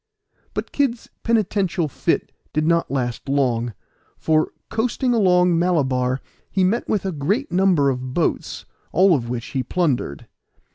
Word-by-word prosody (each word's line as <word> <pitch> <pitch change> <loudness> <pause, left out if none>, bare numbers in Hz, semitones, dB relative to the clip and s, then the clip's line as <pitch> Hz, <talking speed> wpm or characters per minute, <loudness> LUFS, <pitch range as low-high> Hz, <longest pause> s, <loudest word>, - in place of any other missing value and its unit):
But - - -3
Kid's 255 -5 -1
penitential 200 -7 +1
fit 140 - -1 0.2
did 155 +1 +1
not 170 +1 +2
last 125 -1 -3
long, 120 -5 +1 0.4
for, 155 -1 +1 0.2
coasting 245 +2 0
along 180 -5 +4
Malabar, 130 -7 +1 0.3
he 190 - +1
met 205 +6 +1
with 205 -3 0
a 190 - 0
great 190 - -1
number 175 -7 +3
of 125 0 -5
boats, 170 - -1 0.3
all 185 -4 +5
which 120 0 -4
he 135 - -1
plundered. 135 - -1
165 Hz, 135 wpm, -22 LUFS, 130-195 Hz, 0.4 s, all